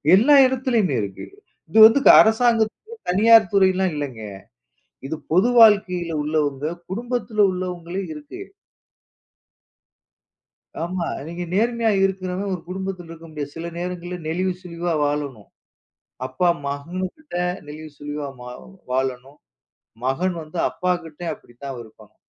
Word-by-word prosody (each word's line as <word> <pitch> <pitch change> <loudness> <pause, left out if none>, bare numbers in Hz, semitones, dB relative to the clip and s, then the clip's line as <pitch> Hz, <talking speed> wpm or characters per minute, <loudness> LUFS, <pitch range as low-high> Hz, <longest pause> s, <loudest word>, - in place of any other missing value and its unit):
எல்லா 265 +9 +5
இடத்துலயுமே 240 - 0
இருக்கு. 100 -2 -6 0.4
இது 220 - +3
வந்து 225 +5 +6
க - - +10
அரசாங்க 225 0 +3 0.4
தனியார் 220 +1 +6
துறைலாம் 190 -1 +3
இல்லைங்க. 135 -6 -5 0.9
இது 160 - -3 0.2
பொது 190 +8 +4
வாழ்க்கையில 190 -6 +5
உள்ளவங்க. 145 -2 -1 0.3
குடும்பத்துல 235 0 -2
உள்ளவங்களே 180 0 -4
இருக்கு. 150 - -10 2.4
ஆமா. 175 0 -3 0.2
நீங்க 170 +1 -5
நேர்மையா 230 +2 +1
இருக்குறவ 190 0 -3
ஒரு 180 - -5
குடும்பத்தில 185 -2 -5
இருக்க 165 0 -11
முடியாது. 145 -2 -6
சில 170 +1 -5
நேரங்கள்ல 180 0 -5
நெளிவு 185 +3 -1
சுளிவா 175 -1 -3
வாழணும். 145 -7 -3 0.8
அப்பா 175 +7 +1 0.2
மகன்கிட்ட 180 - -6 0.3
நெளிவு 155 +1 -9
சுளிவா 145 0 -5
மா 125 - -8 0.4
வாழணும். 130 +2 -2 0.7
மகன் 175 +7 0
வந்து 155 +3 -9
அப்பாகிட்டே 175 -2 -3
அப்படித்தான் 130 +2 -10
இருப்பாங்க. 110 -2 -18
175 Hz, 110 wpm, -22 LUFS, 150-195 Hz, 2.4 s, க